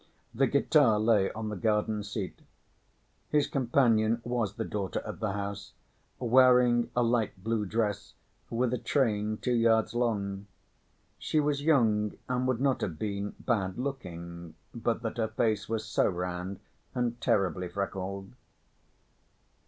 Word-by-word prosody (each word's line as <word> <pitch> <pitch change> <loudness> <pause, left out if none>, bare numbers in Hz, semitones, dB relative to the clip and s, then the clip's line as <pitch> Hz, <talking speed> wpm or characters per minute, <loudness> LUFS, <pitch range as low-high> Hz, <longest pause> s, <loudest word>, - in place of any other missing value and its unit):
The 130 +3 +3
guitar 140 -5 +4
lay 105 -3 +3
on 110 0 -4
the 105 - -4
garden‐seat. 105 -1 -1 0.9
His 150 -2 +3
companion 120 -5 +2
was 115 -4 -1
the 115 - -3
daughter 100 -3 -3
of 105 - -7
the 110 -3 -1
house, 100 0 -5 0.4
wearing 125 -1 +5
a 120 - +3
light‐blue 110 -2 0
dress 105 -2 -1 0.3
with 120 +1 0
a 125 - -1
train 110 -6 0
two 125 - -1
yards 115 -1 +3
long. 100 -5 -1 0.7
She 155 - 0
was 145 -1 +1
young 110 -9 +3
and 125 0 0
would 130 -3 0
not 135 -2 +2
have 80 -5 -3
been 100 +1 -3
bad‐looking, 95 - -3 0.2
but 115 0 -1
that 115 - -3
her 110 -1 +1
face 110 -2 0
was 110 -1 -2
so - - +2
round 90 +1 -3 0.4
and 120 -1 -1
terribly 90 -3 +1
freckled. 95 +1 -4
110 Hz, 130 wpm, -29 LUFS, 100-120 Hz, 0.9 s, wearing